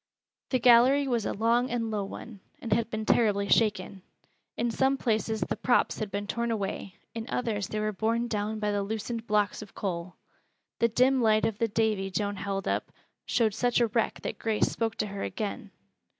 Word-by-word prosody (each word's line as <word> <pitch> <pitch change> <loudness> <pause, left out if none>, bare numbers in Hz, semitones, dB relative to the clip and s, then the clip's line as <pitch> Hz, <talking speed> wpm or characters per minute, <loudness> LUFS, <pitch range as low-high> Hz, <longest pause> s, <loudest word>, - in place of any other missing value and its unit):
The 255 - +2
gallery 255 +3 +6
was 235 -5 0
a - - -1
long 235 +4 +2
and 230 -2 -2
low 210 -2 -1
one, 210 +1 -9 0.2
and 230 -3 -1
had 230 +1 +1
been 220 -1 -3
terribly 205 -3 +3
shaken. 210 -3 +1 0.6
In 235 0 0
some 265 +3 +2
places 220 -2 0
the - - -1
props 245 - +1
had 215 - -3
been 200 +1 -3
torn 235 +3 -2
away, 200 -3 -3 0.2
in 230 0 -5
others 220 -7 -1
they 215 - -3
were 215 0 0
borne 230 +3 0
down 215 -1 -2
by 210 -1 -1
the 205 0 0
loosened 225 +3 -4
blocks 210 0 +1
of 210 - -12
coal. 175 -2 -4 0.6
The 235 - +4
dim 255 +3 +3
light 215 -1 +4
of 220 -2 -2
the 230 - +2
"Davy" 215 -3 0
Joan 200 +2 -2
held 195 0 -3
up - - -1 0.4
showed 220 -3 +2
such 245 +3 +1
a 235 -2 +3
wreck 230 +1 0
that - - -4
Grace 220 -2 +1
spoke 225 -1 -2
to - - -1
her 200 -1 -6
again. 210 -1 -4
220 Hz, 195 wpm, -28 LUFS, 205-235 Hz, 0.6 s, gallery